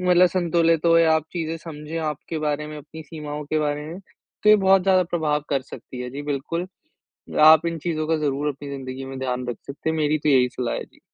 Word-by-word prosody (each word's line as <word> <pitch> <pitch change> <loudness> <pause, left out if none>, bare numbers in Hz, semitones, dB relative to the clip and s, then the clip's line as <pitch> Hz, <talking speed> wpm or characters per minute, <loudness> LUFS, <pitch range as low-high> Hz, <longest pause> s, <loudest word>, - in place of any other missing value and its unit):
मतलब 180 0 +5
संतुलित 170 -2 +1
हो। 165 0 +6
या 160 -1 +5
आप 160 -1 0
चीज़ें 165 -2 -3
समझे 155 0 -8
आपके 155 +1 -4
बारे 150 0 -1
में, 150 - -7
अपनी 155 +2 -11
सीमाओं 150 -1 -7
के 155 +2 -1
बारे 150 0 -1
में, 170 +4 -8
तो 210 +2 -6
ये 215 - +8
बहुत 190 0 +6
ज़्यादा 185 -1 +4
प्रभाव 155 -4 -1
कर 135 -2 +1
सकती 125 -1 -10
है। 125 - -6
जी, 140 +2 -6
बिल्कुल। 150 +5 -3 0.8
आप 160 +1 +8
इन 165 0 -2
चीज़ों 155 -1 -2
का 160 0 +2
ज़रूर 145 -1 -1
अपनी 140 0 -7
ज़िन्दगी 135 -1 -6
में 135 0 -7
ध्यान 125 -1 -3
रख 120 - -4
सकते 140 +3 -4
हैं। 160 - -1
मेरी 150 0 +2
तो 150 - 0
यही 125 -3 +4
सलाह 125 -2 -1
है। - - -4
जी। - - -26
155 Hz, 230 wpm, -23 LUFS, 140-165 Hz, 0.8 s, ये